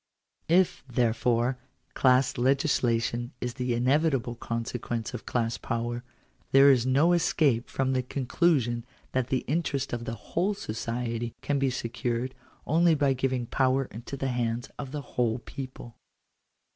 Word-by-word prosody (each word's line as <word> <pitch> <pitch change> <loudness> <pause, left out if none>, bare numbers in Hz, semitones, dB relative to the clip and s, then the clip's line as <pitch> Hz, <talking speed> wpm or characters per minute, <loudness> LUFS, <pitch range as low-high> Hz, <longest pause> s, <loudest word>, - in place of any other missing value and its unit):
If, 180 +1 +3
therefore, 120 +1 +1 0.3
class 130 0 +3
legislation 120 -3 +1
is 125 -1 -3
the 125 -2 -1
inevitable 130 0 +2
consequence 115 0 -4
of 120 - -7
class 115 -1 -1
power, 120 0 -3 0.5
there 135 +1 +8
is 125 -2 +2
no 145 +7 +4
escape 145 -8 +2
from 135 0 0
the 130 - +2
conclusion 125 -2 +1 0.3
that 130 -2 0
the 130 - -1
interest 140 -3 -1
of 120 0 -3
the 115 - -3
whole 180 - -1
society 115 - -3
can 145 -1 0
be 135 -1 +2
secured, 125 0 -2 0.3
only 165 +1 +4
by 140 -2 +2
giving 130 -1 -1
power 130 +2 +1
into 120 +5 -7
the 135 0 -1
hands 120 0 -2
of 135 -2 -5
the 150 0 -4
whole 120 -3 -1
people. 130 -1 -8
125 Hz, 140 wpm, -28 LUFS, 120-135 Hz, 0.5 s, there